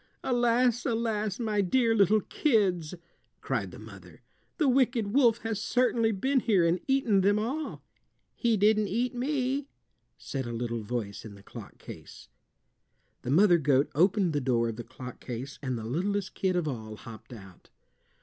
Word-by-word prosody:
"Alas, 245 -1 +2
alas! 225 -4 -1
My 215 -3 0
dear 230 +4 +2
little 210 0 +4
kids!" 185 - 0 0.4
cried - - -2
the - - -11
mother. - - -13 0.3
"The 305 - +2
wicked 245 -5 +2
wolf 240 -4 +4
has 225 -2 -2
certainly 235 -2 +2
been 260 +7 +1
here 205 -8 +2
and 170 +2 +2
eaten 260 -8 +2
them 205 +2 +3
all." 265 +9 -3 0.5
"He 235 -3 +1
didn't 210 +1 +3
eat 240 +6 -1
me," 265 +1 -1 0.5
said 135 -3 -5
a 120 - -5
little 115 0 -3
voice 105 -2 -4
in 105 -2 -10
the 100 - -16
clock - - -11
case. - - -12 0.9
The - - -6
mother 175 +4 +5
goat 140 0 +2
opened 180 +2 +2
the 145 - 0
door 120 -3 +1
of 110 - -6
the 120 - -5
clock 125 0 -10
case 130 +3 -7
and 130 -3 -2
the 110 - -6
littlest 190 - -2
kid 185 -1 0
of 175 -3 0
all 110 -6 -5
hopped 110 +2 -12
out. 95 -6 -13
200 Hz, 165 wpm, -28 LUFS, -, 0.9 s, mother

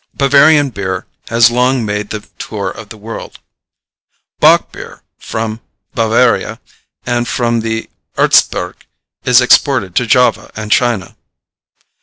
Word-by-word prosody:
Bavarian 145 +1 +4
beer 95 -3 -4 0.2
has 115 +1 +4
long 125 0 +1
made 105 0 -3
the 110 - -5 0.2
tour - - -4
of - - -11
the 110 - -10
world. 110 +2 -9 1.0
Bock - - +4
beer - - -11 0.2
from 110 0 -5 0.3
Bavaria 115 +2 +1 0.5
and 120 -1 -1
from 120 -1 0
the 115 0 -3 0.3
Erzgebirge 90 0 +1 0.4
is 125 0 +5
exported 125 - +2
to 125 - +1
Java 125 +2 +2
and 110 -1 -6
China. 120 -6 0
115 Hz, 120 wpm, -14 LUFS, 110-125 Hz, 1.0 s, is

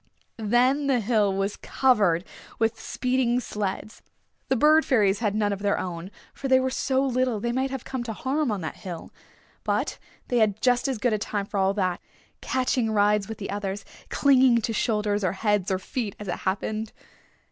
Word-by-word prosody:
Then 250 +6 +2
the 265 -3 +3
hill 215 -2 +2
was 195 +1 -2
covered 200 -10 +2 0.3
with 225 0 0
speeding 250 -1 0
sleds. 210 -2 -4 0.5
The 265 - +3
Bird 305 +5 +5
Fairies 205 -7 +2
had 210 -3 0
none 205 -1 +1
of 195 - -5
their 200 0 +1
own, 175 0 -5 0.2
for 275 - -5
they 260 -1 +5
were 260 0 0
so 265 +1 +1
little 255 -3 0
they 235 +3 -1
might 260 +2 0
have 265 -2 -5
come 260 -2 -4
to 225 - -3
harm 270 +3 -1
on 200 -3 -2
that 160 - -5
hill. 175 -5 -8 0.5
But - - -1 0.3
they 245 - +2
had 215 -2 +2
just 245 +1 +2
as 265 -3 -1
good 230 +1 +1
a 215 - 0
time 205 -1 -2
for 200 0 -3
all 190 0 +3
of 200 - -1
that, 185 -3 -1 0.4
catching 255 -2 0
rides 210 -1 +2
with 220 - -5
the 200 - -5
others, 200 0 -4 0.2
clinging 260 -4 +4
to 225 +1 -2
shoulders 210 -2 0
or 185 - +1
heads 205 -1 0
or 190 - +1
feet 205 +2 -4
as 210 - -7
it 175 - -1 0.2
happened. 215 +3 -3
220 Hz, 195 wpm, -25 LUFS, 200-255 Hz, 0.5 s, Bird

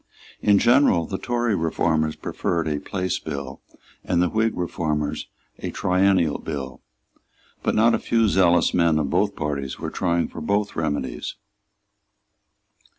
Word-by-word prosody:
In 105 -1 +5
general 120 - +4
the 95 +3 -4
Tory 120 -3 0
reformers 80 -2 0
preferred 85 -2 -2
a 75 -2 -1
Place 90 +5 -2
Bill, 70 -4 -6 0.4
and 90 -2 0
the 90 0 +3
Whig 110 0 0
reformers 75 -4 -2 0.3
a - - -4
Triennial 90 -4 +2
Bill; 70 -5 -6 0.8
but - - 0
not 115 +2 +4
a - - +1
few 115 -1 +2
zealous 90 -3 +3
men 85 -3 +3
of 75 -3 -1
both 100 +3 +1
parties 70 -4 -3
were - - -5
for - - -17
trying 85 -3 +1
both 100 +5 -2
remedies. 75 -2 -3
85 Hz, 140 wpm, -23 LUFS, 75-100 Hz, 0.8 s, In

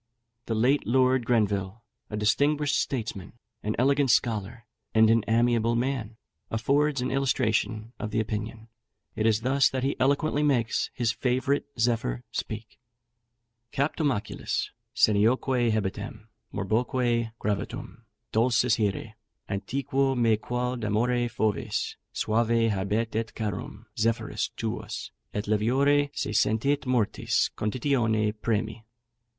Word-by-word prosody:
The 115 - -1
late 125 +5 +2
Lord 130 0 +3
Grenville, 105 -2 0 0.3
a 105 - -4
distinguished 145 +7 +2
statesman, 110 -7 -3 0.3
an 105 +1 -2
elegant 140 +2 +3
scholar, 115 0 +1 0.3
and 110 0 +6
an 115 -1 +3
amiable 115 0 +2
man, 120 -3 -2 0.3
affords 140 +5 +1
an 125 - -1
illustration 115 -4 0
of 110 - -3
the 110 - 0
opinion: 110 +1 -4 0.5
It 110 - +1
is 110 -1 +2
thus 135 +3 +3
that 130 -1 -3
he 135 - 0
eloquently 145 +2 +2
makes 130 -6 +1
his 120 -2 +1
favourite 130 +3 0
Zephyr 115 - 0
speak: 110 0 -5 0.9
"Captum 145 +1 +1
oculis, 105 -3 -3 0.2
senioque 120 +3 +3
hebetem, 110 +1 -3 0.2
morboque 115 +3 0
gravatum, 105 -2 -4 0.3
Dulcis 115 0 +3
here, 105 +1 -1 0.3
antiquo 135 +6 0
me 115 -2 +4
quod 125 +2 -3
amore 120 +3 +1
foves, 110 -2 -1 0.2
Suave 115 +1 +1
habet 105 +3 -1
et 115 0 -2
carum 105 0 -5
Zephyrus 115 +1 0
tuus, - - -4 0.2
et 105 - -3
leviore 135 +7 +3
Se - - -2
sentit 135 +7 +1
mortis 120 -5 +1
conditione 110 -2 +1
premi. 110 0 -1
115 Hz, 115 wpm, -27 LUFS, 110-130 Hz, 0.9 s, and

